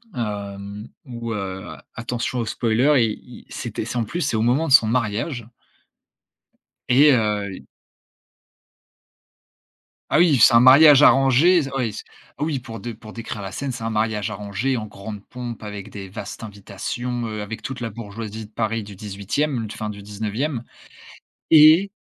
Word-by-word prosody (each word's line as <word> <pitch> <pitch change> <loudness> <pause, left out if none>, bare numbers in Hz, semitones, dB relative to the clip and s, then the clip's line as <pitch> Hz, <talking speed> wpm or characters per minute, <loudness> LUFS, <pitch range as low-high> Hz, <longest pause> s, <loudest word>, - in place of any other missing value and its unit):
hem, 100 -1 -5 0.2
où, 120 -3 -6
heu, 95 -1 -5 0.2
attention 120 +1 -3
au 115 - -1
spoiler, 120 +5 +2
i 115 +3 -6
il - - -13
c'était 110 -2 -5
c'est, 125 - -4
en - - +1
plus, 170 +12 -4
c'est 135 -5 0
au 110 - +1
moment 125 +8 +2
de 135 - +2
son 110 - +7
mariage 115 +1 -2 1.4
et 140 +4 +6
heu, 105 -4 +1
i - - -14 2.4
Ah - - +3
oui, 160 -7 +5
c'est 115 - +7
un 115 - +8
mariage 140 +3 +8
arrangé, 135 +6 +5
ze 135 - -5
oui, 120 -5 -1
c - - -8 0.3
oui, 150 -3 -1
pour 115 -2 -9
de 120 0 -6
pour 110 0 -12
décrire 115 -3 -6
la 95 - -6
scène, 140 +3 -4
c'est 120 -2 -7
un 115 - -2
mariage 110 -1 -1
arrangé 105 +6 -2
en 110 - -4
grande 105 0 -8
pompe 120 -3 -7
avec 105 -2 -7
des 100 -2 -8
vastes 100 +3 -8
invitations, 115 +4 -5
heu, 110 -1 -5
avec 110 +2 -6
toute 135 -1 -6
la 115 -1 -3
bourgeoisie 110 0 -7
de - - -25
Paris 110 0 -2
du 100 - -10
18e, 110 +6 -3
fin 105 -1 -4
du 100 -1 -9
19e 110 +6 -3 0.9
et 160 +5 +7
115 Hz, 165 wpm, -22 LUFS, 105-130 Hz, 2.4 s, un